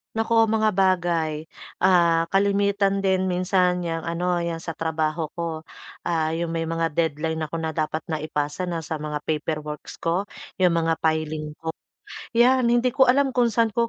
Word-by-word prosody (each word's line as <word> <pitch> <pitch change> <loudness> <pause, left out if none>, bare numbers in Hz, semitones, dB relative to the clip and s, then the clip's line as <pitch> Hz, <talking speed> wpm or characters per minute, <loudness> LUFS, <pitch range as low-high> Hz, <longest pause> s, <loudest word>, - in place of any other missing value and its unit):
Naku, 225 +1 +1
mga 220 -2 +1
bagay. 170 -5 +1 0.3
Ah, 170 -3 +4
kalimitan 200 +1 +2
din 190 -1 +1
minsan 180 0 +2
'yang, 165 -2 -3
ano, 175 +1 -1
'yang 165 -1 -3
sa 165 -1 -6
trabaho 160 0 -2
ko, 165 -2 -4 0.4
ah, 160 -2 0
'yong 170 0 -2
may 165 0 -2
mga 165 0 -1
deadline 160 0 -1
ako 160 - -6
na 160 - -1
dapat 155 0 -2
na 155 - -1
ipasa 150 +3 -3
na, 165 -2 -3
sa 155 0 -4
mga 150 -1 -4
paperworks 150 -1 -4
ko, 180 +5 0 0.3
'yong 180 -2 +4
mga 165 -1 +1
filing 155 -1 -1
ko. 160 -1 -4 0.7
'Yan, 250 0 +5
hindi 240 +1 +2
ko 265 -1 +4
alam 270 +1 +3
kung 245 -2 +3
saan 230 0 +1
ko 235 +2 +1
170 Hz, 170 wpm, -24 LUFS, 160-195 Hz, 0.7 s, Yan